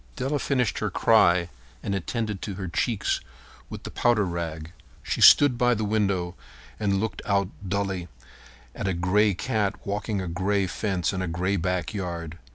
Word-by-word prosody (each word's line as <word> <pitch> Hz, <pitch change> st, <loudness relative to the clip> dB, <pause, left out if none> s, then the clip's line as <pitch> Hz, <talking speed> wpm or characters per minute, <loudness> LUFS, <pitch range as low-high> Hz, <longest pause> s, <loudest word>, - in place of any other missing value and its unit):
Della 140 Hz, +2 st, -1 dB
finished 125 Hz, -7 st, 0 dB
her -, -, -1 dB
cry 85 Hz, 0 st, +4 dB, 0.4 s
and 100 Hz, -, -2 dB
attended 105 Hz, +1 st, -3 dB
to 100 Hz, -, -5 dB
her 95 Hz, -1 st, -5 dB
cheeks 105 Hz, +5 st, 0 dB, 0.5 s
with -, -, -8 dB
the -, -, -7 dB
powder 120 Hz, -4 st, +2 dB
rag. 85 Hz, -2 st, -4 dB, 0.3 s
She -, -, -2 dB
stood 135 Hz, -4 st, +7 dB
by 125 Hz, -1 st, +4 dB
the 110 Hz, 0 st, -2 dB
window 100 Hz, -4 st, 0 dB, 0.5 s
and 100 Hz, -2 st, +1 dB
looked 105 Hz, -1 st, -3 dB
out 100 Hz, -2 st, +1 dB, 0.2 s
dully 95 Hz, -2 st, -2 dB, 0.7 s
at -, -, -4 dB
a 95 Hz, -, 0 dB
gray 100 Hz, +3 st, +2 dB
cat 105 Hz, -1 st, -1 dB
walking 105 Hz, +1 st, -2 dB
a 95 Hz, -, -4 dB
gray 95 Hz, +3 st, 0 dB
fence 95 Hz, -4 st, -1 dB
in 95 Hz, -, -2 dB
a 95 Hz, -, -2 dB
gray 90 Hz, +4 st, -1 dB
backyard. 85 Hz, -2 st, -3 dB
100 Hz, 165 wpm, -26 LUFS, 90-105 Hz, 0.7 s, stood